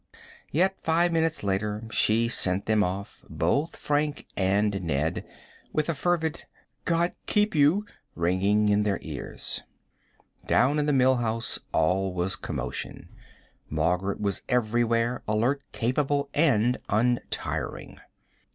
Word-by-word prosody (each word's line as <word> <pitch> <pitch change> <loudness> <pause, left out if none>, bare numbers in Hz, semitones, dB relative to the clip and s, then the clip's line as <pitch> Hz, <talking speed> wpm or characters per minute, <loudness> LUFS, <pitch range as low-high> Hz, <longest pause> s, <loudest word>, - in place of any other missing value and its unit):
Yet 190 +5 +1
five 170 +2 +2
minutes 165 -4 0
later 105 +2 -1
she 115 +2 +3
sent 95 -4 +1
them 110 -1 +3
off, 95 +2 -5
both 90 - 0
Frank 145 0 -1
and 100 +1 +1
Ned, 80 -2 -1 0.5
with 155 +1 0
a - - +2
fervid 160 +1 -1 0.4
"God 170 +1 +1
keep 210 0 +2
you" 155 +7 +3 0.3
ringing 95 +5 +2
in 105 0 +3
their 105 -2 +1
ears. - - -5 0.9
Down 145 +4 +3
in 150 - 0
the - - +3
Mill 130 -1 +4
House 115 -1 -1
all 90 +3 +1
was 90 +2 0
commotion. - - -5 0.6
Margaret 90 +6 0
was 100 -2 -1
everywhere, 120 0 +1
alert, 120 +7 +1
capable, 140 +3 0
and 125 -6 +3
untiring. 120 +4 -2
115 Hz, 120 wpm, -27 LUFS, 100-145 Hz, 0.9 s, Mill